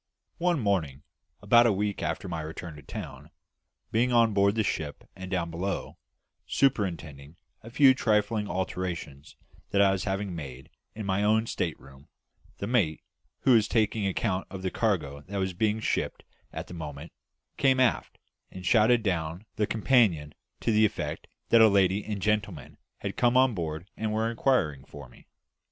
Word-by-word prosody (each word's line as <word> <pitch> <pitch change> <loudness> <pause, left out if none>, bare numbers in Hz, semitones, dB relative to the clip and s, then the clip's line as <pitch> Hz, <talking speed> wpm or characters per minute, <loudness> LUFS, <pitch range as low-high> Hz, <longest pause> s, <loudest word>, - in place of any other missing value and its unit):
One 175 -2 +2
morning, 80 - -1 0.4
about 120 +3 +6
a - - +4
week 105 +1 -1
after - - -3
my 85 -3 -4
return 80 +1 -7
to 75 - -11
town, - - -8 0.6
being 120 +3 +2
on 115 -2 +4
board 100 +1 +3
the 110 - +1
ship 75 -7 -4
and 95 -1 -8
down 85 -3 -2
below, 95 +4 -4 0.5
superintending 85 - -1 0.3
a 115 - -11
few 135 +2 +6
trifling 105 -3 0
alterations 90 -6 -4 0.3
that 100 - +1
I 100 -1 +5
was 95 -1 -2
having 100 -2 -2
made 65 -4 -8 0.2
in 110 -1 -5
my 95 +1 0
own 110 +2 +3
state 85 -7 -3
room, 70 +1 -16 0.5
the - - -4
mate, 100 -11 +1 0.4
who 130 - +3
was 110 -2 +4
taking 110 -2 +1
account 95 0 -1
of 95 -1 -8
the 95 - -1
cargo 80 -11 -1
that 100 +1 -5
was 95 -1 -1
being 105 +4 0
shipped - - -2 0.3
at - - -6
the - - -11
moment, 75 -2 -7 0.5
came 135 -2 +3
aft 130 -2 +1 0.3
and 90 -1 -10
shouted 115 +3 +4
down 85 -1 -2
the 105 - 0
companion 105 - +2 0.3
to - - +1
the 110 0 +4
effect 105 - -2 0.2
that 115 - +6
a 110 - +9
lady 100 0 +3
and 105 -3 -5
gentleman 105 0 -2 0.2
had - - -4
come 120 +1 +3
on 130 -1 +4
board 80 -1 -4
and 110 -1 -2
were 110 +1 0
inquiring 95 - +1
for 70 -2 -11
me. - - -20
100 Hz, 170 wpm, -28 LUFS, 85-110 Hz, 0.6 s, a